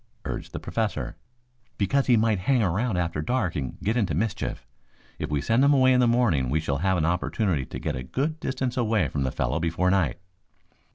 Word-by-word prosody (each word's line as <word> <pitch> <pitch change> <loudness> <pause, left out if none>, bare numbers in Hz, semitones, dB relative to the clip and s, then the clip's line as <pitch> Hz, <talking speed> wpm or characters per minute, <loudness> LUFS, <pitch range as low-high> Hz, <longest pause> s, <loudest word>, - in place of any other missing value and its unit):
urged - - -5
the - - -5
Professor. 90 - -2 0.6
"Because 135 +8 +1
he 120 -3 +5
might 110 -2 +2
hang 120 +5 +2
around 100 +3 0
after 85 -3 -1
dark 95 -1 -1
and 65 -4 -4
get 110 +5 +1
into 110 -6 +1
mischief. 105 - -2 0.5
If - - -3
we 75 -2 0
send 115 - +2
him 140 +1 +5
away 130 -1 +5
in 125 - +4
the 125 - +4
morning 110 - +2
we 75 +5 +1
shall 70 -3 -2
have 95 +2 +1
an 80 - +1
opportunity 90 - 0
to - - -6
get - - -3
a 65 - -4
good 145 - -2
distance 130 -1 -2
away 110 - +1
from 70 - -3
the 65 -1 0
fellow 80 - -1
before 85 +2 +1
night." 90 -9 +1
95 Hz, 210 wpm, -26 LUFS, 80-120 Hz, 0.6 s, he